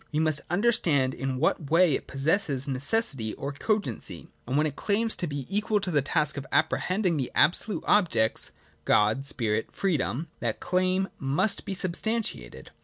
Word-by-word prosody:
We 150 - -2
must 155 -2 +2
understand 175 - +2
in 130 -1 -3
what 150 0 0
way 165 -1 +4
it - - -3
pos 135 - -7
sesses 150 -4 +1
necessity 135 - +1
or 140 - -5
cogency: 210 +8 -2 0.2
and 130 +3 0
when 150 - +3
it 145 -3 -3
claims 220 +5 0
to 175 - -2
be 145 -3 -5
equal 210 +1 0
to 195 -2 -3
the 145 -3 +2
task 150 +2 0
of 140 - -6
apprehending 180 +2 +1
the 130 -3 -3
absolute 205 +4 +2
objects 160 - +2 0.3
(God, 110 +6 +2
Spirit, 110 -5 -1
Freedom), 155 - -1
that 115 -2 -2
claim 185 +1 0
must 145 +10 0
be 195 - -3
substan 210 +5 0
tiated. - - -7
155 Hz, 170 wpm, -27 LUFS, 135-195 Hz, 0.3 s, way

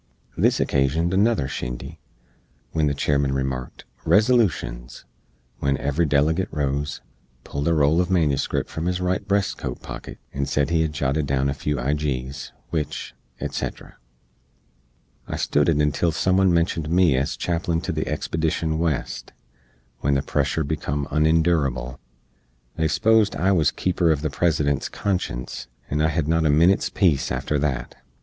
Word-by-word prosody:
This - - +2
occasioned 75 +6 +1
another 100 - +2
shindy; 60 -2 -6 0.7
wen 80 -2 +2
the 70 - 0
Chairman 70 -1 +1
remarked 65 -2 -4 0.2
"Resolushens," 100 - +1 0.6
wen 70 -1 +1
every 70 +5 0
delegate 75 +6 +2
rose, 70 0 -2 0.4
pulled 70 +2 -3
a 85 - +3
roll 75 +4 +4
uv 90 - -7
manuscript 80 -7 +1
from 80 +2 -4
his 90 0 0
right 90 0 0
breast 100 0 0
coat 60 -1 -5
pocket, - - -8 0.2
and 70 0 -2
sed 70 +2 +1
he 80 -1 +3
hed 80 -1 0
jotted 70 +1 0
down 70 0 +1
a - - 0
few 75 +1 -2
ijees, 70 0 -2 0.2
wich, 75 -4 -3 0.3
etc. - - -5 1.3
I - - -4
stood 75 +1 +1
it 80 - +2
until 75 +3 +2
some 85 +4 +1
one 95 -1 +4
mentioned 85 -2 0
me 85 -4 +4
ez 70 +2 -1
Chaplin 85 -1 -1
to 95 - -3
the 80 -1 -2
expedition 80 +1 -1
West, 80 -6 -2 0.7
when 70 0 +1
the 70 - +1
pressure 80 - 0
becum 70 -1 -2
unendurable. 75 -5 +1 0.8
They 80 -1 +1
sposed 105 +7 +3
I 95 +2 +2
was 80 -6 +3
keeper 90 -1 -1
uv 80 -4 +3
the 75 -2 -2
President's 75 -3 +1
conscience, 90 -13 -3 0.2
and 75 +2 +1
I 80 - +4
hed 75 -1 -1
not 80 0 +2
a - - +2
minit's 85 +7 +4
peece 85 -8 +1
after 75 - -1
that. 65 -4 -2
75 Hz, 155 wpm, -23 LUFS, 70-85 Hz, 1.3 s, roll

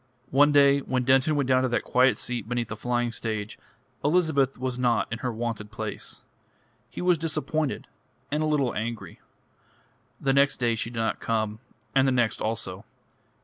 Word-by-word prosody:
One 145 +2 +5
day, 140 -1 +5
when 130 -2 -1
Denton 135 +4 +3
went 140 -3 0
down 130 -1 +4
to 130 - +1
that 120 - 0
quiet 130 +1 +3
seat 120 -2 -3
beneath 120 -2 -2
the 105 - -4
flying 120 +1 -1
stage, 110 -2 -4 0.4
Elizabeth 145 -4 +2
was 125 0 -3
not 120 -2 +2
in 115 - -4
her 125 0 -2
wonted 115 -2 -4
place. 110 -1 -6 0.7
He - - -6
was 180 -3 +3
disappointed, 155 -2 -2 0.5
and 150 +1 0
a 155 - +1
little 140 -5 +1
angry. 110 -5 -5 1.0
The 135 -1 +1
next 140 0 +3
day 120 -2 +1
she 115 0 -3
did 120 - -9
not 115 0 -1
come, 110 -1 -1 0.3
and 135 0 +4
the - - +3
next 120 -3 +1
also. 105 -4 -3
125 Hz, 175 wpm, -26 LUFS, 115-140 Hz, 1.0 s, One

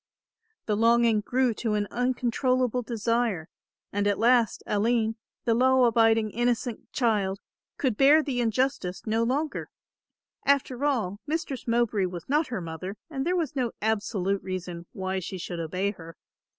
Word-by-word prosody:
The 210 - 0
longing 230 0 +4
grew 250 +2 +1
to 220 0 -1
an 205 0 0
uncontrollable 250 0 +1
desire 230 -6 -1 0.5
and 205 0 +1
at 205 - +2
last 235 -2 +3
Aline, 220 +1 +1 0.3
the 230 - +3
law 260 +2 +4
abiding 225 -2 +3
innocent 240 0 -1
child, 205 -5 +1 0.4
could 255 -7 0
bear 295 +3 +6
the 255 -4 -1
injustice 225 -5 -1
no 225 +1 +1
longer. 280 +6 -1 0.7
After 275 -2 +1
all, 215 -9 0
Mistress 295 -5 -3
Mowbray 230 -5 +2
was 175 -2 -8
not 295 +2 +2
her 225 -6 -4
mother 170 +5 -6
and 270 0 -2
there 360 - +2
was 315 -5 -2
no 250 -4 -1
absolute 205 -3 0
reason 180 -2 -5
why 190 0 -3
she 185 +1 -6
should 175 -1 -5
obey 185 +5 -1
her. 165 -4 -12
230 Hz, 150 wpm, -27 LUFS, 200-250 Hz, 0.7 s, bear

